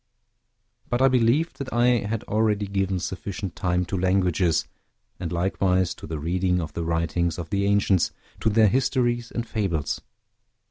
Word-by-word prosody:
But 120 - 0
I 135 - +6
believed 130 +6 +2
that 135 -1 -5
I 120 +1 +2 0.2
had 110 0 -2
already 105 -1 +1
given 95 -1 -1
sufficient 95 +1 -5
time 90 0 0
to 95 - -4
languages, 90 -2 +2 0.5
and 85 - -4
likewise 90 0 +1
to - - -11
the 80 - -4
reading 90 +4 0
of 80 -3 -5
the 85 - -3
writings 85 +1 0
of 85 -2 -6
the 100 0 +1
ancients, 100 -2 +2 0.3
to 110 - +2
their 110 0 +5
histories 120 0 +1
and 120 0 -4
fables. 90 -10 -2
95 Hz, 155 wpm, -25 LUFS, 90-110 Hz, 0.5 s, I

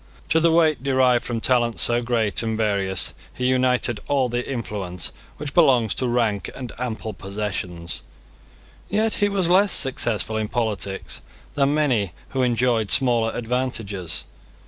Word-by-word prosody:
To 160 - +4
the 165 0 +3
weight 160 -4 +3
derived 130 -3 +3
from 120 -2 -3
talents 120 -2 +2
so 120 0 +2
great 115 -6 0
and 110 -1 -2
various 100 -4 +1 0.2
he 125 - -4
united 125 -3 +2
all 135 -3 +1
the 120 +2 -3
influence 100 -8 -4 0.3
which 145 -1 -5
belongs 125 - +4
to 130 - -1
rank 115 -4 0
and 125 -3 -6
ample 110 -3 -4
possessions. 95 -4 -5 0.9
Yet 215 +2 +1
he 205 - +4
was 195 -3 +1
less 190 +3 +4
successful 115 -4 +2
in 110 -1 -1
politics 105 -4 -3 0.3
than 140 0 +2
many 120 - +1 0.2
who 135 - -1
enjoyed 120 -3 +1
smaller 120 -4 +2
advantages. 115 -7 -3
120 Hz, 145 wpm, -23 LUFS, 105-130 Hz, 0.9 s, To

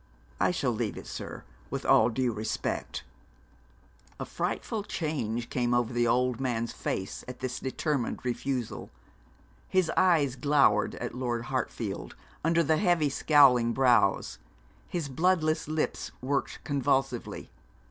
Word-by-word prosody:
'I - - +3
shall - - 0
leave - - -2
it, - - -8
sir, - - -7 0.3
with - - -4
all 110 +2 +5
due 125 +1 0
respect.' 110 +1 -3 1.2
A - - -3
frightful 220 - -2
change 130 - -3
came 120 -1 +1
over 120 0 +1
the 120 0 +2
old 125 +1 +2
man's 120 -3 -1
face 95 0 -4
at 125 0 -8
this 130 -1 -3
determined 135 -2 -2
refusal. 125 -1 -3 0.8
His 185 -3 +2
eyes 155 -8 +3
glowered 140 -7 +3
at 120 - -5
Lord 120 -2 -2
Hartfield - - -3 0.3
under 165 +1 +3
the 155 +1 +2
heavy 175 -6 +3
scowling 135 -5 +5
brows; 120 -6 +3 0.5
his 170 -5 -3
bloodless 155 +1 +1
lips 155 0 -2
worked 135 +2 -2
convulsively. 135 -2 -1
130 Hz, 125 wpm, -29 LUFS, 120-155 Hz, 1.2 s, all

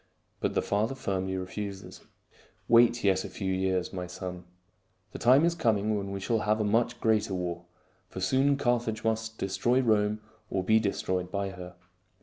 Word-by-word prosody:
But - - -1
the - - +1
father 110 +6 0
firmly 95 -5 -2
refuses. 95 +1 -6 0.3
" - - -27 0.3
Wait 120 0 +5
yet 95 -2 +3
a - - -6
few 95 -2 -3
years, 95 -1 -1
my 90 -1 -4
son. 90 0 -7 0.7
The - - -8
time 130 +6 +5
is 170 - +2
coming 110 -8 +1
when 100 -1 -3
we 100 0 -4
shall 115 +4 0
have 105 0 +1
a - - +1
much 115 +3 +1
greater 110 -3 +1
war; 90 -1 -4 0.4
for - - -7
soon 135 +9 +2
Carthage 120 -4 0
must 110 0 -1
destroy 120 +6 +1
Rome 105 -3 +2 0.3
or 95 - -1
be 110 +3 +4
destroyed 95 -3 -2
by 100 -1 -2
her. 90 -1 -10
105 Hz, 175 wpm, -28 LUFS, 95-115 Hz, 0.7 s, Wait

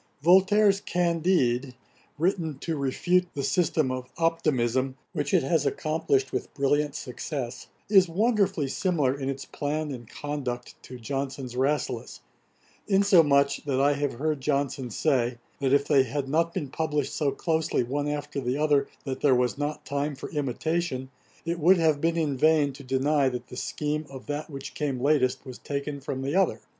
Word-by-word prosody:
Voltaire's 195 +3 +5
Candide, 165 -8 +1 0.4
written 165 -3 0
to 165 +3 -3
refute 175 +6 +1
the 140 - -2
system 155 -2 +1
of 130 0 -5
Optimism, 135 -6 +1 0.2
which 145 -4 -2
it - - +3
has 150 +2 +2
accomplished 155 -3 0
with - - -3
brilliant 145 +1 +1
success, 125 0 -5 0.2
is 195 -4 +5
wonderfully 195 - +1
similar 145 -3 0
in 135 -1 -3
its 135 0 -4
plan 150 +1 -3
and 120 -4 -8
conduct 130 -5 -5
to 125 - -10
Johnson's 135 0 -4
Rasselas; 140 +4 -1 0.7
insomuch, 165 -9 +4
that 135 -2 0
I 140 +1 +4
have 145 -1 -1
heard 150 +3 -2
Johnson 140 -2 -1
say, 125 -1 +1 0.2
that 135 -2 0
if 140 0 +4
they 140 -3 +5
had 135 +2 -2
not 165 +4 +1
been 145 -4 -4
published 150 -1 -1
so 150 -3 +1
closely 160 -2 0
one 145 +4 -2
after 145 -1 -3
the 125 +1 -1
other 150 -2 +2 0.2
that 135 -2 -4
there 140 -3 +5
was 125 0 +1
not 145 +1 -4
time 145 +1 -2
for 135 - -8
imitation, 145 -1 -2 0.3
it 170 +1 -2
would 180 +4 +5
have 155 -3 +2
been 165 0 +1
in 150 -5 0
vain 150 -1 +3
to 140 - -11
deny 135 +2 +2
that 125 -1 -6
the - - -9
scheme 150 +3 -3
of 135 -1 -10
that 150 +2 -4
which 140 -1 -7
came 140 -4 -2
latest 135 -1 +2
was 130 -2 -9
taken 140 0 -4
from 130 0 -4
the 140 - -2
other. 195 - +2
145 Hz, 170 wpm, -27 LUFS, 135-160 Hz, 0.7 s, Voltaire's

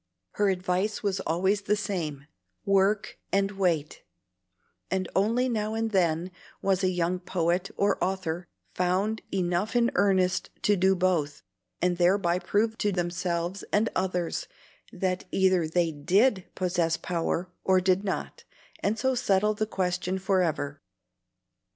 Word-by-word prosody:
Her 205 -1 +1
advice 185 +3 -1
was 195 -2 0
always 190 +5 +1
the 205 +1 +1
same, 170 -9 -3 0.4
"Work 195 +1 +2
and 195 0 +2
wait;" 175 -7 -1 0.9
and 190 -1 -1
only 230 +6 +2
now 215 -2 -1
and 225 0 -1
then 175 -2 +1 0.3
was 195 -1 +1
a 185 - +3
young 180 0 0
poet 180 0 0
or 200 -1 +1
author 180 -2 -2 0.3
found 190 +5 0
enough 185 +4 0
in 240 0 +3
earnest 190 -1 +2
to 205 - +4
do 190 +1 +3
both, 170 -5 0 0.4
and 180 -1 +2
thereby 175 0 +3
prove 215 +5 0
to 205 - +1
themselves 175 0 -2
and 215 +2 +2
others 180 -2 -1 0.4
that 185 -2 -2
either 185 -3 +2
they 170 +1 +1
DID 190 - +2
possess 175 -3 0
power, 175 +1 -2
or 190 -1 +4
did 185 +1 +2
not, 195 - -4 0.4
and 210 +2 0
so 260 +3 +1
settle 210 -4 +2
the 215 +1 -2
question 180 -1 -1
forever. 175 -7 0
185 Hz, 135 wpm, -27 LUFS, 175-200 Hz, 0.9 s, to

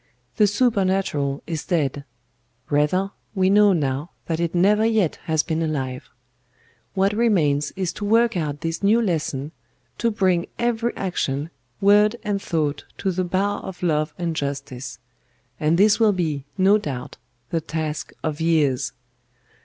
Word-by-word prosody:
The 210 - +5
Supernatural 190 - +1
is 160 -2 -4
dead; 145 -5 -1 0.7
rather, 165 +7 +2 0.2
we 190 0 +3
know 205 0 +6
now 145 -2 -1 0.2
that 165 -1 -2
it 170 0 -1
never 205 +5 +4
yet 220 -7 +2
has 160 -1 +1
been 160 0 -2
alive. 135 -5 -3 0.9
What 195 +1 +2
remains 160 -11 +2
is 185 -3 -2
to 205 - -5
work 230 +1 +3
out 150 -4 -2
this 165 0 -3
new 210 +3 +4
lesson, 155 - -1 0.5
to 235 - +2
bring 185 -5 +1
every 235 0 0
action, 160 -5 -2 0.3
word 210 +2 +5
and 205 -3 -1
thought 155 -5 -1
to 190 - -1
the 185 +1 -1
bar 195 +3 0
of 180 -2 -8
Love 155 -2 0
and 170 -2 -2
Justice; 140 -3 -4 0.6
and 155 +2 +2
this 205 +3 +5
will 220 -2 +5
be, 155 -7 -2
no 195 +3 +5
doubt, 140 -6 -6 0.3
the 165 - 0
task 155 -1 -4
of 155 0 -2
years. 155 -6 +1
170 Hz, 145 wpm, -23 LUFS, 150-200 Hz, 0.9 s, know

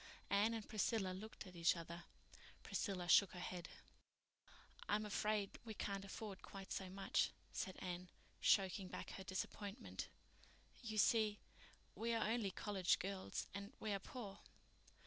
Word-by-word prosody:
Anne 210 +3 +5
and 220 -2 -4
Priscilla 215 -3 +2
looked 215 +4 -6
at 185 -1 -10
each 170 +1 +5
other. 170 +1 -6 0.6
Priscilla 185 -4 -1
shook 195 +2 +8
her 180 - -6
head. 180 0 -4 1.2
"I'm 215 +1 +3
afraid 210 -1 +1
we 220 -2 -5
can't 195 -1 -1
afford 200 0 -5
quite 195 -1 -8
so 190 -1 -1
much," 195 +1 +2 0.2
said 185 - -2
Anne, 180 0 -4 0.3
choking 190 -1 +4
back - - -5
her 190 - -6
disappointment. 200 +4 -3 0.7
"You 220 -3 -3
see, 215 0 +5 0.6
we 230 +1 +1
are 220 -1 +2
only 225 -4 +2
college 190 -2 +2
girls 190 0 -2
and 200 +1 -5
we 215 -2 0
are 200 - +1
poor." 200 -1 -6
200 Hz, 145 wpm, -43 LUFS, 185-215 Hz, 1.2 s, shook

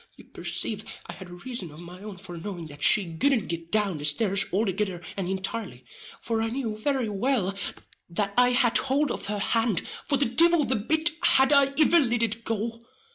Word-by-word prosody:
You - - -14
percave - - -4 0.2
I - - -8
had 185 -2 -11
a - - -11
reason 195 -1 -5
of 150 +1 -13
my 175 +2 -11
own 205 -2 -9
for 180 -2 -10
knowing 175 0 -7
that 145 -1 -12
she 180 -1 +5
couldn't 265 - +2
git 170 0 -4
down 205 -7 0
the 145 - -4
stares 195 +6 +2
althegither 195 -1 -1 0.2
and 190 -2 -3
intirely; 195 +4 -5 0.4
for 225 -1 -1
I 225 - -1
knew 235 -3 -3
very 260 +2 -1
well 210 -1 0 0.6
that 200 +3 -1
I 250 0 +5
had 245 -1 +4
hould 275 +1 +1
of - - -5
her 210 0 -2
hand, 225 -1 0 0.2
for 280 - +2
the 275 - +2
divil 330 +5 +4
the 260 - 0
bit 315 +10 +2
had 265 +2 +5
I 275 -1 +4
iver 335 +2 +5
lit 240 -5 +1
it 230 0 -2
go. 225 +1 -3
215 Hz, 200 wpm, -26 LUFS, 190-255 Hz, 0.6 s, she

